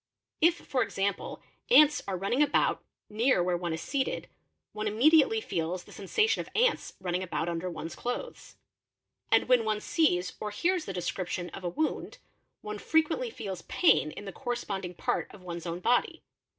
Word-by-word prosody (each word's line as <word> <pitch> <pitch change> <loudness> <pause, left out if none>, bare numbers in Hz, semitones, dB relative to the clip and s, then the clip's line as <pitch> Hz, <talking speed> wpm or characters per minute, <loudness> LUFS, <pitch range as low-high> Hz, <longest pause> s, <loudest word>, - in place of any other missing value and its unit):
If 335 +2 +5
for 265 -6 -2
example 200 -3 -2 0.3
ants 305 -10 +7
are 190 -2 -2
running 200 +9 0
about 290 -1 +2 0.2
near 220 -2 +2
where 180 0 +1
one 175 -1 -3
is 160 0 -3
seated, 275 -2 -2 0.5
one 215 0 -3
immediately 310 - +5
feels 175 - -3
the - - -16
sens 195 -2 -10
ation 440 0 +4
of - - -10
ants 475 +1 +2
running 180 -1 -2
about 175 -2 -2
under 170 +1 -2
one's 165 -1 -6
clothes; 245 - -5 0.8
and - - +4
when 250 -2 +5
one 215 -1 0
sees 190 - +1
or 210 - -3
hears 345 - 0
the - - -4
description 180 0 -3
of 190 - -9
a 175 - -1
wound, 310 - -2 0.4
one 210 0 -6
frequently 320 - +1
feels 195 - -6
pain 330 - +3
in 205 - -9
the 195 - -6
corresponding 200 -8 -4
part - - -1
of 195 - -14
one's 170 -1 -6
own 170 +1 -4
body. 245 +6 +1
210 Hz, 175 wpm, -29 LUFS, 180-295 Hz, 0.8 s, ants